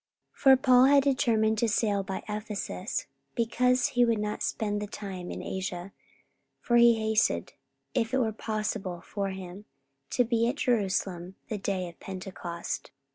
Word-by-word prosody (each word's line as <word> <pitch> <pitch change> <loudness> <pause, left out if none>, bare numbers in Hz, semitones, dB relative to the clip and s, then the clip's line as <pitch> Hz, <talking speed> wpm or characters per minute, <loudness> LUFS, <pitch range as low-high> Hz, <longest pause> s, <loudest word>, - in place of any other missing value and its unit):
44:020:016 - - -27
For 265 -1 +8
Paul 255 -1 +6
had 280 0 +6
determined 225 -5 +2
to 235 - +2
sail 205 -2 +1
by 190 0 -5
Ephesus, 215 - -3 0.3
because 250 +2 +2
he 245 - +3
would 230 -2 +3
not 210 0 -3
spend 205 -1 -1
the 210 - -3
time 190 -3 -6
in - - -5
Asia: 185 0 -4 0.7
for 240 - +2
he 235 0 +7
hasted, 220 -1 +1 0.4
if 225 -3 0
it 265 - +2
were 230 -4 +1
possible 215 -5 -3
for 200 -2 -3
him, 190 +1 -8 0.4
to 250 - +3
be 230 0 +1
at 255 - -2
Jerusalem 190 -8 -1
the 215 - -3
day 190 -2 -2
of 170 - -12
Pentecost. 185 -2 -6
215 Hz, 160 wpm, -28 LUFS, 190-235 Hz, 0.7 s, For